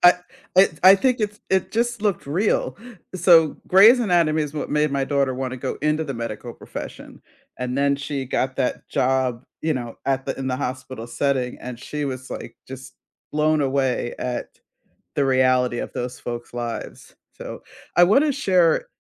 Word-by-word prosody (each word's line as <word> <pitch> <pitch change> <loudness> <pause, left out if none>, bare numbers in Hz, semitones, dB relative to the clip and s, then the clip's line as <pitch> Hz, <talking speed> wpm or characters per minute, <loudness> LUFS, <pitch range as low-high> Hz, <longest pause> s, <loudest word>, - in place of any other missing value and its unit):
I 175 - +9 0.4
It's 185 -5 +4
I 190 +1 +10
think 250 +3 +1
it's 210 0 -2
it 190 -1 +1
just 235 0 0
looked 205 -8 0
real. 180 +9 0 0.4
So, 170 -3 +5
Grey's 215 +7 +7
Anatomy 170 -7 +2
is 150 0 -5
what 150 - -4
made 150 0 +2
my 140 -1 0
daughter 140 -2 0
wanna 130 0 -4
go - - -4
into 150 +1 +1
the 140 -3 -4
medical 115 0 -5
profession, - - -9 0.4
and 125 0 -3
then 140 0 +2
she 140 -1 -4
got 130 +1 -1
that 130 -2 -2
job, 130 -1 0 0.2
you 155 -2 0
know, 120 -2 -5
at 135 -1 0
the 135 - -3
in 135 - -3
the 125 - -1
hospital 130 -3 -5
setting, 130 -1 -1
and 125 -1 -7
she 150 +3 -4
was, 130 -2 -5
like, - - -7
just 130 0 -10 0.4
blown 155 0 +2
away 135 -3 0
at 125 -1 -3 0.7
the 140 - +2
reality 130 -2 +2
of - - -5
those 125 +1 -4
folks' 120 0 -6
lives. 120 -1 -6 0.2
So, - - -9 0.3
I 175 - +7
wanna 275 +11 +4
share 190 - +2
140 Hz, 175 wpm, -23 LUFS, 130-170 Hz, 0.7 s, I